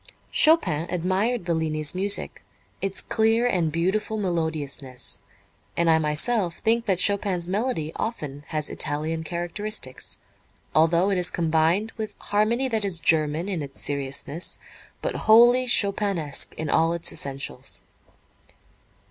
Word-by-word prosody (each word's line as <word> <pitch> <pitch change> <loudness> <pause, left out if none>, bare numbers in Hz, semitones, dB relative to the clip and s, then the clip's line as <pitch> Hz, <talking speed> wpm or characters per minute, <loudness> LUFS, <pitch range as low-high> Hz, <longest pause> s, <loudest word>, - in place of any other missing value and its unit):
Chopin 180 - +4
admired 185 +5 0
Bellini's 155 -3 -1
music, 195 +2 +1 0.4
its 195 0 -2
clear 225 +1 +1
and 175 -9 +1
beautiful 195 +6 -1
melodiousness, 155 -8 -3 0.6
and 170 -1 +3
I 160 - +4
myself 165 +5 +1
think 230 +1 +1
that 190 -3 +2
Chopin's 190 -3 +2
melody 195 -5 -1
often 145 - -4
has 155 -1 -2
Italian 155 +2 -2
characteristics, 175 -3 -3 0.6
although 170 +5 +3
it 190 - +1
is 180 0 +3
combined 165 +6 +1
with 215 -1 -5
harmony 225 +5 0
that 220 -4 -1
is 190 -4 -1
German 155 +2 +1
in 185 -5 -3
its 140 -1 -8
seriousness, 140 +3 -2 0.5
but - - -1
wholly 240 +3 +6
Chopinesque 200 -9 +1
in 160 - -4
all 165 +2 +2
its 170 -1 0
essentials. 135 0 -3
175 Hz, 120 wpm, -24 LUFS, 155-210 Hz, 0.6 s, wholly